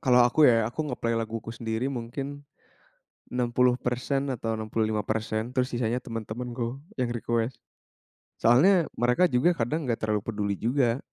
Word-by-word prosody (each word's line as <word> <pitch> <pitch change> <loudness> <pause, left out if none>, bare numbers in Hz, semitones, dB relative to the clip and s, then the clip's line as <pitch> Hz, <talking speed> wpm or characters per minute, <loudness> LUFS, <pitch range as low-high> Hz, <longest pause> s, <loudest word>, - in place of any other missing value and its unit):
Kalau 125 -2 +5
aku 125 +6 0
ya. 115 -2 +3
Aku 140 - -5
nge-play 115 -3 -1
laguku 115 0 -5
sendiri 115 +2 -2
mungkin 120 +4 -5 1.1
60% 125 +2 +1
atau 115 -2 -2
65%, 110 +1 -1
terus 125 -1 +2
sisanya 120 0 0
teman-temanku, 120 +2 -4 0.2
yang 125 -1 +1
request. 120 +1 -1 0.8
Soalnya 165 - +5
mereka 125 +7 +3
juga 125 +8 +4
kadang 150 +7 -1
nggak 115 - +1
terlalu 110 -1 +1
peduli 105 -2 -1
juga. 125 +1 +1
120 Hz, 130 wpm, -27 LUFS, 115-125 Hz, 1.1 s, Kalau